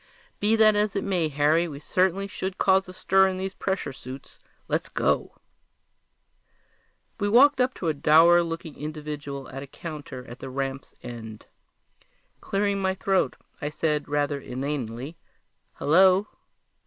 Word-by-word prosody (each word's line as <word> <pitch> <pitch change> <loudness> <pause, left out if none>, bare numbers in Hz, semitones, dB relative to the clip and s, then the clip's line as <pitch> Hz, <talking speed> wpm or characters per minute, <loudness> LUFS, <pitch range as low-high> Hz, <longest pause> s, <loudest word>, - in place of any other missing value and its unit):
"Be 210 +2 +3
that 215 -1 +5
as 210 -1 +1
it 200 - -1
may, 180 -5 0
Harry, 150 +4 +2
we 145 -3 -8
certainly 185 +4 +1
should 190 -1 -5
cause 190 -1 +3
a - - -6
stir 190 +1 +3
in 190 -1 -2
these 190 +1 -4
pressure 190 -9 -3
suits. 130 +1 -11 0.3
Let's - - -1
go!" - - 0 1.8
We 205 - 0
walked 265 +4 +6
up 255 +1 +1
to 170 - -4
a 160 - +2
dour 165 +4 +6
looking 165 -2 -5
individual 150 -2 -6
at 135 +1 -7
a 140 - -8
counter 145 -4 -8
at 120 0 -11
the 135 - -7
ramp's 135 0 -4
end. 110 -3 -8 0.9
Clearing 200 0 -1
my 190 0 0
throat, 190 0 +1 0.3
I 150 - -2
said 150 -1 -1
rather 145 0 0
inanely, 135 +2 -4 0.6
"Hello!" 185 +5 +4
160 Hz, 145 wpm, -26 LUFS, 140-190 Hz, 1.8 s, walked